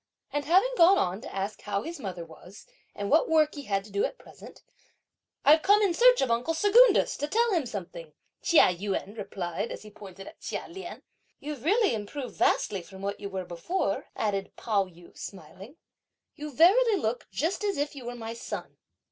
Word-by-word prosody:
And 290 0 -1
having 380 +11 +3
gone 360 +4 +7
on 185 - -1
to - - -9
ask 195 +2 -4
how 205 0 -2
his 335 +2 -7
mother 185 -7 -6
was, 170 +5 -14 0.3
and 200 0 -4
what 315 - +4
work 310 -1 +3
he 285 -2 -8
had 195 -3 -1
to 210 - -14
do 200 0 0
at - - -2
present; - - -15 0.8
"I've 310 +2 +7
come 410 +4 +4
in 385 -4 +2
search - - +5
of 255 - +1
uncle 245 +8 0
Secundus, 415 +5 +5
to 290 - -2
tell 465 +7 +2
him 330 -9 0
something," 175 -7 -8 0.3
Chia 305 - +5
Yün 200 +2 -4
replied, 190 -2 -4
as - - -7
he 210 - -12
pointed 195 -2 -11
at - - -13
Chia - - -4
Lien. 355 0 -9 0.4
"You've 290 -4 -7
really 405 - +3
improved 230 +4 -5
vastly 195 -3 +1
from 190 +2 -12
what 200 0 -3
you 200 - -6
were 190 -1 -4
before," 175 - -3
added 195 -2 -2
Pao 205 -4 0
yü 175 -1 -17
smiling; 200 - -10 0.6
"you 300 0 -7
verily 405 - +5
look 240 -5 -2
just 335 - -2
is 405 -2 -1
if 290 +1 -2
you 260 -3 -9
were 245 0 -5
my 225 -1 -6
son!" 230 - -7
235 Hz, 195 wpm, -28 LUFS, -, 0.8 s, gone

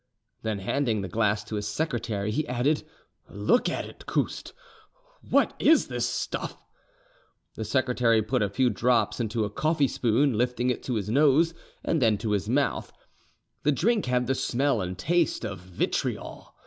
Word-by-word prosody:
Then 110 -2 -2
handing 110 +2 0
the 95 - -4
glass 105 +2 +1
to 105 +1 -5
his 105 0 -3
secretary, 110 -5 -2
he 155 +7 -1
added, 125 +5 +1 0.5
"Look 105 - +2
at - - -3
it, - - -13
Couste: - - -2 0.8
what - - +3
is 320 - +4
this - - -1
stuff?" - - -4 0.9
The 110 - -5
secretary 120 -1 +2
put 125 +3 0
a 100 - +1
few 125 +5 +2
drops 120 +4 +1
into 115 -1 -1
a 100 - -5
coffee 155 +3 +1
spoon, 125 +2 +1
lifting 125 +2 +1
it 125 - -4
to 125 - -1
his 105 -1 -2
nose 150 +5 +4 0.3
and 165 - 0
then 110 -3 +4
to 110 0 -3
his 105 0 -1
mouth: 140 +3 0 0.7
the 150 - +3
drink 210 - +1
had 125 0 +1
the 135 - +1
smell 130 -2 0
and 90 0 -4
taste 170 - +1
of 105 -3 -5
vitriol. 90 0 -3
120 Hz, 165 wpm, -27 LUFS, 105-140 Hz, 0.9 s, is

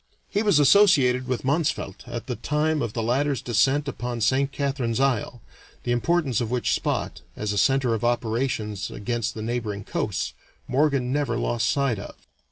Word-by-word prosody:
He 205 - +1
was 205 -7 +3
associated 140 -6 +5
with 130 0 -2
Mansvelt 145 - -1
at 120 -1 -5
the 125 - -3
time 150 +2 0
of 110 - -2
the 115 - -2
latter's 135 +3 +1
descent 135 +5 +1
upon 120 -3 -4
Saint 130 +5 +2
Catharine's 135 -5 -1
Isle, 125 -3 0 0.4
the 120 - -1
importance 135 0 +1
of 115 - -2
which 125 0 0
spot, - - -2
as 105 -1 -2
a - - -3
center 135 +2 +3
of 110 - -2
operations 115 -3 -1
against 115 +1 -3
the 110 - -5
neighboring 110 -3 -3
coasts, - - -2 0.3
Morgan 135 -2 +1
never 140 -5 0
lost 120 -1 0
sight 135 -7 +1
of. - - -9
125 Hz, 170 wpm, -25 LUFS, 115-140 Hz, 0.4 s, associated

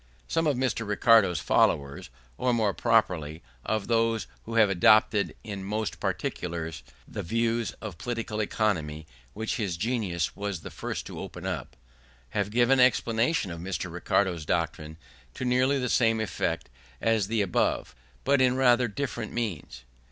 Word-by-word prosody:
Some 165 -1 +1
of 145 -4 +1
Mr. 120 -4 -1
Ricardo's 105 -4 +4
followers, 70 -3 +1 0.3
or 125 - +1
more 105 -4 +1
properly, 90 - +1 0.2
of 110 +3 -1
those 115 -1 +1 0.2
who 115 - -5
have 110 -2 +6
adopted 100 +2 +4
in 100 -3 -6
most 105 +2 -3
particulars 80 -3 -3 0.3
the - - -5
views 115 +3 0
of 100 -6 -7
political 115 -3 -3
economy 80 -8 -1 0.3
which 110 +1 -3
his 100 -7 -2
genius 100 -6 -1
was 100 -4 -4
the - - -8
first - - -5
to - - -8
open - - -7
up, - - -4 0.5
have 100 +5 -1
given 120 +4 +3
explanations 120 - +2
of 85 - -8
Mr. 90 0 -4
Ricardo's 90 -1 0
doctrine 80 -1 -2 0.4
to 130 - -4
nearly 130 +3 +3
the 125 -2 -1
same 115 -2 +3
effect 110 - -2 0.3
as 110 -3 +1
the 110 -1 +1
above, 90 - 0 0.3
but 140 0 +3
in 130 -1 +4
rather 125 -1 +4
different 120 +3 -4
terms. 85 - -4
110 Hz, 150 wpm, -27 LUFS, 90-120 Hz, 0.5 s, have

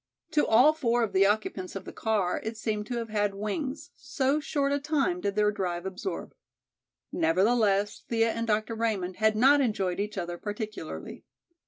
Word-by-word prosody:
To 300 -2 +2
all 250 +8 +6
four 240 -6 +1
of 220 - -2
the 195 +1 +5
occupants 205 -3 -2
of 195 - -6
the - - -8
car 210 -5 0
it 220 0 -4
seemed 210 -1 -2
to 245 - -3
have 230 -1 -4
had 205 -2 0
wings, 265 +8 -4
so 275 +1 0
short 285 -2 -1
a 285 - +1
time 275 - 0
did 200 0 -1
their 210 0 +3
drive 180 -3 -3
absorb. 190 - -5 0.8
Nevertheless 200 +4 +2
Thea 230 -1 +2
and 230 0 -3
Dr. 215 +1 0
Raymond 210 -5 -2
had 220 0 +3
not 275 +6 +5
enjoyed 195 -7 0
each 210 0 -3
other 175 -1 -4
particularly. 215 +1 -6
215 Hz, 175 wpm, -28 LUFS, 195-245 Hz, 0.8 s, all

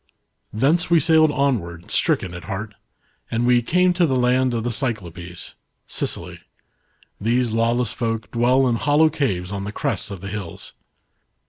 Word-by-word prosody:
''Thence 145 +11 +1
we 170 -1 +5
sailed 155 0 +4
onward, 95 - -1
stricken 90 - +1
at 90 - -8
heart. 105 +1 -5 0.6
And 115 +1 0
we 125 0 +4
came 180 +8 +2
to 175 -1 +2
the 135 - 0
land 125 0 +2
of 115 - -2
the 120 - -1
Cyclopes 90 -8 -4 0.3
(Sicily). - - -4 0.8
These 120 +2 +1
lawless 115 +1 +1
folk 115 -2 -3
dwell 125 +3 +3
in 120 -2 +1
hollow 150 +5 +3
caves 95 -10 -1
on 100 -1 -4
the 100 - -4
crests 110 - -2
of 100 -3 -7
the 100 +2 -7
hills. 95 -4 -7
120 Hz, 155 wpm, -22 LUFS, 100-135 Hz, 0.8 s, we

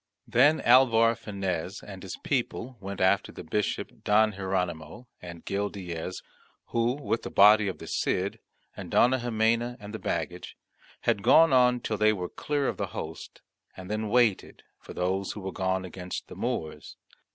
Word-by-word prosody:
Then 155 +2 +4
Alvar 115 -2 +5
Fanez 100 -4 -4
and 95 -2 -10
his 95 - -7
people 130 -1 -2
went 100 0 -7
after 95 0 +2
the - - -9
Bishop 105 +6 -3
Don 110 +1 +4
Hieronymo 95 +2 -3 0.2
and 85 -2 -10
Gil 100 +1 -1
Diaz, 90 -2 -6 0.5
who, 115 +1 +1
with 135 -4 -2
the - - -6
body 105 +1 +6
of 95 - -3
the - - -10
Cid, 95 +2 -1 0.4
and - - -8
Dona 130 +2 +4
Ximena, 120 +1 0
and 105 0 -10
the 110 - -5
baggage, 85 +2 -4 0.4
had 100 - +1
gone 165 +7 +6
on 125 -1 +4
till 110 - -3
they 110 0 +4
were 90 -3 -4
clear 145 -2 -2
of - - -2
the - - -2
host, - - -7 0.4
and 95 +1 -8
then 110 0 -2
waited 115 -3 +1 0.2
for - - -12
those 95 +2 -1
who 105 - -8
were 95 0 -4
gone 95 0 -1
against 90 0 -7
the - - -9
Moors. 80 -1 -4
105 Hz, 170 wpm, -27 LUFS, 95-115 Hz, 0.5 s, body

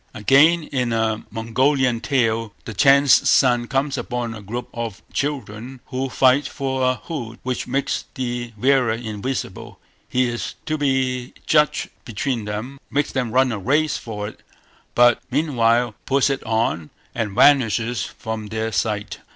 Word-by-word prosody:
Again, 140 +10 +5
in 125 -5 -2
a 110 -1 0
Mongolian 125 +2 +1
tale, 115 -5 0
the 110 - -6
Chan's 140 +5 +5
son 120 -3 +4
comes 135 +2 -1
upon 120 -2 -3
a 110 - -9
group 120 +5 -5
of 115 -3 -5
children 130 -3 -4
who 130 0 -2
fight 130 +2 +3
for 135 -2 -3
a 130 0 +2
hood 120 -7 -7
which 130 -1 -3
makes 135 +2 -1
the 120 -2 -3
wearer 130 +1 +3
invisible; 115 +3 -5 0.3
he 125 0 +2
is 120 0 -4
to 155 - -1
be 130 -4 -1
judge 150 -1 +2 0.2
between 115 0 -3
them, 110 +7 -5
makes 145 0 0
them 125 -3 -2
run 130 +2 +3
a 110 - -3
race 145 +9 +1
for 105 -3 -5
it, 105 - -11 0.5
but 120 0 +5
meanwhile 120 -6 +2
puts 140 0 +3
it 135 - -3
on 110 -9 0 0.2
and 105 -4 -3
vanishes 120 -3 +3
from 110 -1 -6
their 110 +1 -3
sight. 105 +2 -2
125 Hz, 150 wpm, -21 LUFS, 110-135 Hz, 0.5 s, Again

